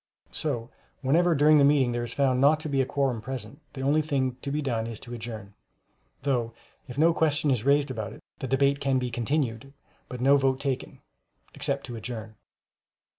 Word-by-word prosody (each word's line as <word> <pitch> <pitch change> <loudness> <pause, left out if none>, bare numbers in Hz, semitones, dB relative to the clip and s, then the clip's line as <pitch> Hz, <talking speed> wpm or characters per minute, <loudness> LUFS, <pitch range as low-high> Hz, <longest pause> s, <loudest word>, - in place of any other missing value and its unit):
So 125 -6 -3 0.3
whenever 165 +5 +3
during 150 +1 +6
the - - +5
meeting 140 -3 +4
there 120 0 -2
is 115 -1 -5
found 130 -2 +2
not 150 +3 +5
to 155 - -4
be 140 -2 +1
a 130 - -1
quorum 135 -6 0
present, 130 +3 -7
the 135 - -6
only 145 +3 +3
thing 135 -5 -1
to 140 - -4
be 150 - -1
done 120 -6 -1
is 115 -2 -6
to 120 - -9
adjourn—though 115 - -6 0.3
if 125 - -9
no 165 +3 +5
question 155 -2 +1
is 120 -5 0
raised 140 0 +3
about 110 -5 -4
it, - - -14 0.2
the 130 - -4
debate 140 +2 +2
can 135 -2 +1
be 125 -1 -2
continued, 120 +1 -2 0.4
but 125 - -6
no 135 +3 +5
vote 135 -1 +1
taken, 135 -3 -3 0.5
except 140 0 -2
to 120 - -7
adjourn. 110 -1 -6
135 Hz, 190 wpm, -27 LUFS, 120-140 Hz, 0.5 s, during